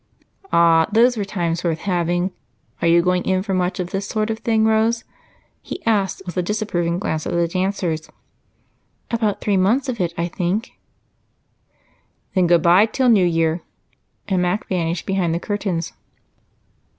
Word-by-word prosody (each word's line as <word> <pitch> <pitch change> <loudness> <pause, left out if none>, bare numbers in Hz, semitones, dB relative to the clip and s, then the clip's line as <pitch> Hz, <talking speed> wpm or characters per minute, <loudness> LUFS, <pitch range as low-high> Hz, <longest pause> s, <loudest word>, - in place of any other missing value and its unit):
"Ah, 165 -1 +5
those 240 +3 +4
were 210 - -2
times 175 -4 -2
worth 165 -2 -1
having! 175 -1 0 0.5
Are - - +2
you 170 0 +5
going 180 0 +2
in 185 0 0
for 195 -1 -3
much 180 0 -1
of 180 -1 -3
this 195 +1 -3
sort 215 0 -1
of 220 - -4
thing, 220 -1 +1
Rose?" 220 +1 +2 0.6
he 360 - -8
asked 200 -4 0
with 175 - -6
a 180 - +1
disapproving 175 -4 -1
glance 160 -5 -2
at - - -3
the 170 0 +2
dancers. 185 -3 -2 1.0
"About 225 -3 0
three 205 -2 +1
months 230 +9 +2
of 235 -3 -3
it, 170 -1 -1
I 170 - 0
think." 180 +5 -2 1.6
"Then 185 -3 +3
good 170 -1 +4
bye 180 +5 +6
till 255 +3 +1
New 195 -6 +5
Year." 165 0 +1 0.7
And 190 -3 +1
Mac 180 +4 -1
vanished 170 -2 -2
behind 185 -4 0
the - - -1
curtains. 185 -5 -3
185 Hz, 160 wpm, -21 LUFS, 170-210 Hz, 1.6 s, bye